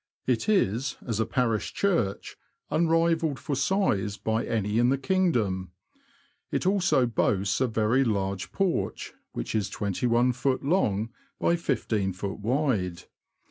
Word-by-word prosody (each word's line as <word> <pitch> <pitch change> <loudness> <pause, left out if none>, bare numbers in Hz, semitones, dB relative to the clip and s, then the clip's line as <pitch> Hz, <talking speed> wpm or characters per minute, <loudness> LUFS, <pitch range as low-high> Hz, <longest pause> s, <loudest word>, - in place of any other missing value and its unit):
It 125 - 0
is, 135 - +1
as 115 -3 -2
a 110 - +1
parish 115 -5 0
church, 165 - 0 0.4
unrivalled 165 -1 +2
for 145 - -3
size 130 - +1
by 110 +1 -1
any 105 0 0
in 120 +1 +4
the 135 - +2
king 185 +6 +2
dom. 95 - -1 0.8
It - - -2
also 190 -9 +3
boasts 105 -2 0
a 130 - +3
very 115 +3 +2
large 100 -5 -2
porch, 195 -3 -1 0.2
which - - -4
is 105 -2 0
21ft. 125 +7 0
long 115 - +1 0.3
by 170 - +3
15ft. 100 - -2
wide. 110 - 0
120 Hz, 130 wpm, -27 LUFS, 105-150 Hz, 0.8 s, in